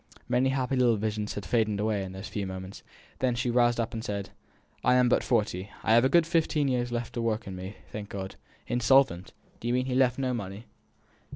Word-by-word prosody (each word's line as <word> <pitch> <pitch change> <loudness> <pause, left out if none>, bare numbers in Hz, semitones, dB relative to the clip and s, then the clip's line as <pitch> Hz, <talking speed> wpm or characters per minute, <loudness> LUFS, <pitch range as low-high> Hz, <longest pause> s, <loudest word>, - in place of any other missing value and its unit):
Many 130 +2 +2
happy 135 0 0
little 125 -3 +4
visions 105 0 -2
faded 105 +1 0
away 105 -2 0
in 95 - -6
those 95 +2 -7
few 100 -2 -3
moments; 95 0 -7 0.4
then 125 -2 +1
she 125 0 0
roused 120 0 +3
up 115 - -1
and 110 -1 -4
said, 100 -2 -4 0.5
"I 125 +1 +4
am 125 -1 +5
but 120 - +3
forty; 105 -5 0
I 110 - +3
have 120 +1 +6
a 130 - +4
good 170 +3 +5
fifteen 160 -3 +1
years 125 -2 0
of 120 0 -4
work 115 -1 -1
in 95 - -6
me 90 0 -6
left 100 +2 -8
yet, - - -24
thank 105 -1 -6
God. 95 -1 -6 0.3
Insolvent! 120 -6 +3 0.3
Do 115 - -5
you 120 - +2
mean 125 0 +1
he 130 - -3
has 125 - +2
left 125 -2 +3
no 130 -2 0
money?" 100 -1 -5
115 Hz, 225 wpm, -28 LUFS, 105-125 Hz, 0.5 s, have